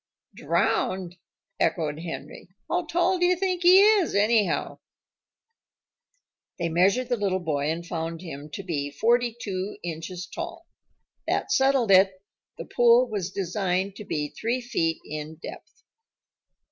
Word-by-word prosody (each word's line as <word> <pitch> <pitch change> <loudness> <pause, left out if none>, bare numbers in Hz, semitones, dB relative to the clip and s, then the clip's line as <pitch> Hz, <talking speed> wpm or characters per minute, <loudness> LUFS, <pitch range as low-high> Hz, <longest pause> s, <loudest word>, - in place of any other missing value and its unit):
"Drowned!" 185 -2 -1 0.4
echoed 155 -3 0
Henry. 165 +2 -8 0.2
"How 350 -1 -1
tall 350 +3 +1
do 355 - +3
you 365 - +3
think 365 -1 -1
he 365 +2 +8
is, 415 - +4
anyhow?" 210 0 +1 1.8
They 170 -2 -1
measured 195 +9 +2
the 245 - +1
little 195 -3 0
boy 150 -4 -1
and 165 +2 -3
found 165 -1 -4
him 150 -3 -8
to 195 - -5
be 145 -6 -3
forty 235 - +1
two 195 -2 -4
inches 170 +2 -5
tall. - - -7 0.6
That - - -1
settled 265 -5 +3
it; 190 0 +5 0.4
the - - -7
pool 240 +1 +4
was 195 -4 -2
designed 190 0 -2
to - - -7
be 150 -6 -3
three 235 - -2
feet 165 -10 -1
in 155 +1 -6
depth. 165 - -11
190 Hz, 135 wpm, -26 LUFS, 165-245 Hz, 1.8 s, he